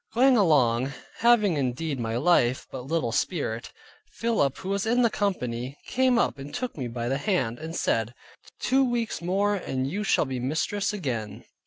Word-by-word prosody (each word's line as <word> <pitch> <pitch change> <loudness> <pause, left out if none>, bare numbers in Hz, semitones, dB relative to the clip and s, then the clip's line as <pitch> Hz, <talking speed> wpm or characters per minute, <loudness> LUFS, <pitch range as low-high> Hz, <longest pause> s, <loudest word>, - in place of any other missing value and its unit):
Going 260 +2 +5
along, 135 - +3 0.3
having 215 -8 +4
indeed 135 +2 -2
my 115 0 -2
life, 130 -4 +3
but 130 0 -7
little 155 -7 0
spirit, 120 -5 -2 0.4
Philip, 225 - 0
who 190 - -6
was 200 +2 -1
in 245 +2 +3
the 230 - +3
company, 130 - -2
came 255 -1 +3
up 145 - +1
and 140 +1 -8
took 250 0 -4
me 130 -5 -4
by 120 0 -4
the 135 +2 0
hand, 135 - 0
and 160 +1 -6
said, 115 -5 0 0.4
two 265 +1 +3
weeks 240 -6 -1
more 195 +4 +1
and 135 -9 -2
you 200 +9 -2
shall 195 - +2
be 130 -2 -4
mistress 160 +11 -1
again. 125 - -4
155 Hz, 175 wpm, -26 LUFS, 125-205 Hz, 0.4 s, Going